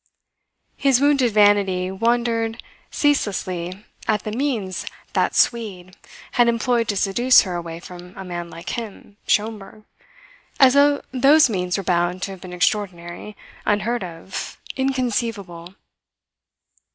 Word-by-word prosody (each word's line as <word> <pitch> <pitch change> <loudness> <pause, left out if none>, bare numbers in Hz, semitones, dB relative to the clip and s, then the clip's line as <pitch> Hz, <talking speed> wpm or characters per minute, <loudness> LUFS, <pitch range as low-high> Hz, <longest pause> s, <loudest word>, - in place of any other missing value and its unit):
His 270 -3 +3
wounded 280 -4 +3
vanity 200 -3 +3
wondered 230 +2 0 0.3
ceaselessly 190 - -1 0.2
at 215 -2 +1
the 215 - -4
means 225 -7 -2 0.3
"that - - +1
Swede" 195 -6 0 0.4
had 240 -1 +3
employed 235 0 +1
to 205 - -1
seduce 240 +7 +5
her 185 - -4
away 170 -1 -5
from 180 +1 -12
a 190 - -6
man 175 -1 -5
like 170 +1 -8
him 210 -3 -7
Schomberg 215 0 -1 0.8
as 260 -2 +7
though 285 0 +4
those 275 +1 +5
means 180 -2 -1
were 195 - -3
bound 175 +1 0
to 195 - -3
have 190 -2 -10
been 185 - -9
extraordinary, 180 +1 -2 0.3
unheard 210 +2 0
of, 175 +1 -7 0.2
inconceivable. 230 -9 -2
205 Hz, 125 wpm, -22 LUFS, 180-240 Hz, 0.8 s, as